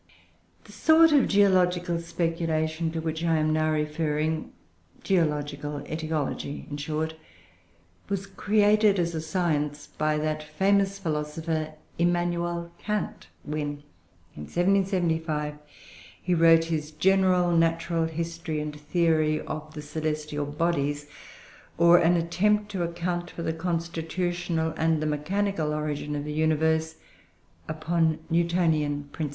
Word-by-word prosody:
The -, -, -15 dB
sort 320 Hz, 0 st, +5 dB
of 285 Hz, -4 st, +5 dB
geological 180 Hz, -4 st, +3 dB
speculation 165 Hz, -1 st, -1 dB
to 165 Hz, -, -2 dB
which 160 Hz, 0 st, -3 dB
I 165 Hz, -1 st, +2 dB
am 155 Hz, 0 st, +1 dB
now 155 Hz, 0 st, +2 dB
referring 155 Hz, +1 st, -1 dB, 0.5 s
(geological 150 Hz, -5 st, -1 dB
aetiology, 155 Hz, -2 st, -3 dB
in 145 Hz, -, -3 dB
short) 155 Hz, +2 st, -2 dB, 1.0 s
was 195 Hz, -1 st, -2 dB
created, 210 Hz, +1 st, +3 dB
as 170 Hz, -1 st, 0 dB
a 160 Hz, -, -2 dB
science, 155 Hz, -4 st, -1 dB
by 155 Hz, 0 st, +2 dB
that 155 Hz, 0 st, -1 dB
famous 195 Hz, +5 st, +1 dB
philosopher 155 Hz, -2 st, -3 dB, 0.2 s
Immanuel 175 Hz, 0 st, 0 dB
Kant, 210 Hz, -2 st, -3 dB, 0.2 s
when, 145 Hz, -1 st, -4 dB, 0.5 s
in 75 Hz, -, -7 dB
1775, 170 Hz, -5 st, 0 dB, 0.6 s
he 180 Hz, -, -1 dB
wrote 165 Hz, -1 st, +6 dB
his 155 Hz, -2 st, -2 dB
"General 180 Hz, +1 st, +3 dB
Natural 165 Hz, 0 st, +1 dB
History 165 Hz, -1 st, -3 dB
and 150 Hz, 0 st, -4 dB
Theory 155 Hz, 0 st, +2 dB
of 155 Hz, 0 st, -6 dB
the 150 Hz, -, -6 dB
Celestial 150 Hz, -1 st, -3 dB
Bodies; 145 Hz, -1 st, -1 dB, 0.7 s
or 170 Hz, +1 st, +7 dB
an 175 Hz, +2 st, +4 dB
Attempt 210 Hz, +5 st, +1 dB
to 190 Hz, -3 st, -3 dB
account 175 Hz, +1 st, -2 dB
for 170 Hz, -, -7 dB
the 160 Hz, -, -1 dB
Constitutional 170 Hz, 0 st, -2 dB
and 160 Hz, -1 st, +2 dB
the 155 Hz, -, -2 dB
Mechanical 155 Hz, +2 st, -1 dB
Origin 150 Hz, -1 st, -3 dB
of 145 Hz, 0 st, -3 dB
the 150 Hz, -, -4 dB
Universe 160 Hz, +1 st, +1 dB, 0.7 s
upon 160 Hz, +1 st, 0 dB
Newtonian 165 Hz, -4 st, +1 dB
principles." 155 Hz, -3 st, -3 dB
160 Hz, 120 wpm, -26 LUFS, 155-175 Hz, 1.0 s, or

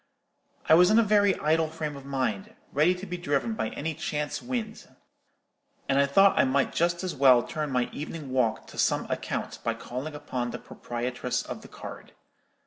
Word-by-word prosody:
I -, -, +6 dB
was 180 Hz, +3 st, +7 dB
in 215 Hz, -, +5 dB
a 230 Hz, -, +6 dB
very 205 Hz, -2 st, +4 dB
idle 160 Hz, +1 st, +1 dB
frame 155 Hz, -2 st, -4 dB
of 140 Hz, -1 st, -10 dB
mind, 130 Hz, -8 st, -2 dB, 0.2 s
ready 155 Hz, +6 st, +4 dB
to 180 Hz, +2 st, -8 dB
be 180 Hz, -2 st, -5 dB
driven 160 Hz, +6 st, -1 dB
by 220 Hz, -, -2 dB
any 160 Hz, +2 st, -4 dB
chance 150 Hz, 0 st, -3 dB
wind; 240 Hz, -3 st, -5 dB, 1.0 s
and 135 Hz, 0 st, +2 dB
I 140 Hz, -, +4 dB
thought 195 Hz, +8 st, +5 dB
I -, -, +7 dB
might 135 Hz, +1 st, +1 dB
just 170 Hz, +1 st, +1 dB
as 185 Hz, -, -2 dB
well 130 Hz, -3 st, +6 dB
turn 155 Hz, -1 st, -3 dB
my 125 Hz, -2 st, +1 dB
evening 150 Hz, -2 st, -6 dB
walk 125 Hz, -4 st, +1 dB
to -, -, -9 dB
some -, -, +2 dB
account -, -, -3 dB
by -, -, 0 dB
calling 135 Hz, +5 st, -6 dB
upon 130 Hz, -5 st, -3 dB
the 125 Hz, -, -5 dB
proprietress 125 Hz, +1 st, -4 dB
of -, -, -7 dB
the -, -, -12 dB
card. -, -, -10 dB
150 Hz, 190 wpm, -27 LUFS, 130-175 Hz, 1.0 s, was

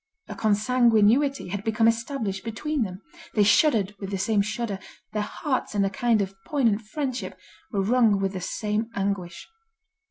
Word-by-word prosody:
A -, -, -6 dB
consanguinity 230 Hz, +3 st, +3 dB
had 200 Hz, +2 st, -4 dB
become 225 Hz, +1 st, +2 dB
established 230 Hz, -4 st, -1 dB
between 265 Hz, +6 st, -2 dB
them. 190 Hz, -2 st, -4 dB, 0.3 s
They 210 Hz, -, +5 dB
shuddered 210 Hz, -2 st, +4 dB
with 195 Hz, -, -5 dB
the 195 Hz, -, -2 dB
same 205 Hz, +2 st, +2 dB
shudder; 215 Hz, -1 st, -3 dB, 0.3 s
their 210 Hz, -, 0 dB
hearts 260 Hz, +3 st, -3 dB
in 200 Hz, -1 st, +3 dB
a 195 Hz, -, -1 dB
kind 225 Hz, 0 st, +2 dB
of 195 Hz, 0 st, -6 dB
poignant 235 Hz, -8 st, +1 dB
friendship, 255 Hz, +3 st, -4 dB, 0.3 s
were 200 Hz, -4 st, 0 dB
wrung 220 Hz, -2 st, +3 dB
with 195 Hz, 0 st, -1 dB
the 185 Hz, -, -4 dB
same 215 Hz, +4 st, -2 dB
anguish. 195 Hz, -3 st, -3 dB
215 Hz, 160 wpm, -25 LUFS, 200-240 Hz, 0.3 s, They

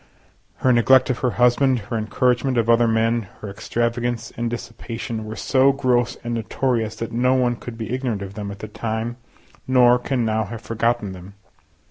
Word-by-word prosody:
Her 130 Hz, -, +2 dB
neglect 130 Hz, +2 st, +5 dB
of 125 Hz, -, -3 dB
her 125 Hz, -, +1 dB
husband, 125 Hz, +2 st, +4 dB
her 115 Hz, +2 st, -5 dB
encouragement 125 Hz, +3 st, +1 dB
of 115 Hz, 0 st, +3 dB
other 115 Hz, 0 st, +4 dB
men, 115 Hz, -1 st, +1 dB
her 105 Hz, -, -6 dB
extravagance 120 Hz, +2 st, -2 dB
and 120 Hz, 0 st, -2 dB
dissipation, 115 Hz, -1 st, -6 dB
were 110 Hz, +1 st, -6 dB
so 135 Hz, +5 st, +3 dB
gross 125 Hz, -3 st, +1 dB
and 120 Hz, 0 st, -3 dB
notorious 115 Hz, -1 st, -1 dB
that 115 Hz, -, -5 dB
no 125 Hz, +2 st, +2 dB
one 125 Hz, -2 st, +2 dB
could 120 Hz, 0 st, -9 dB
be 110 Hz, 0 st, -4 dB
ignorant 125 Hz, -6 st, -2 dB
of 100 Hz, 0 st, -8 dB
them 100 Hz, -1 st, -5 dB
at 100 Hz, -, -7 dB
the 110 Hz, -, -7 dB
time, 110 Hz, +2 st, -4 dB, 0.5 s
nor 125 Hz, -1 st, +5 dB
can 125 Hz, -1 st, -1 dB
now 110 Hz, 0 st, 0 dB
have 110 Hz, +3 st, -7 dB
forgotten 115 Hz, -2 st, -1 dB
them. 95 Hz, +2 st, -11 dB
115 Hz, 180 wpm, -22 LUFS, 110-125 Hz, 0.5 s, neglect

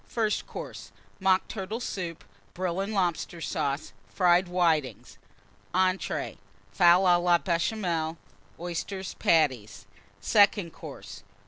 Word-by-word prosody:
FIRST 220 Hz, -3 st, -1 dB
COURSE. -, -, -8 dB, 0.3 s
Mock 190 Hz, -1 st, +2 dB
Turtle 215 Hz, +2 st, -5 dB
Soup. 175 Hz, -8 st, -5 dB, 0.3 s
Brill 180 Hz, 0 st, -2 dB
and 195 Hz, +2 st, -2 dB
Lobster 175 Hz, -4 st, -1 dB
Sauce. 145 Hz, -2 st, -2 dB, 0.2 s
Fried 180 Hz, 0 st, +3 dB
Whitings. 165 Hz, -6 st, 0 dB, 0.6 s
ENTREES. 185 Hz, 0 st, 0 dB, 0.3 s
Fowl 175 Hz, +1 st, +5 dB
à 175 Hz, -1 st, +5 dB
la 175 Hz, -1 st, +5 dB
Béchamel. 170 Hz, -2 st, -1 dB, 0.4 s
Oyster 175 Hz, +3 st, -4 dB, 0.2 s
Patties. 130 Hz, -11 st, +1 dB, 0.3 s
SECOND 200 Hz, -, +3 dB
COURSE. 100 Hz, -, -10 dB
175 Hz, 105 wpm, -27 LUFS, 165-190 Hz, 0.6 s, Fowl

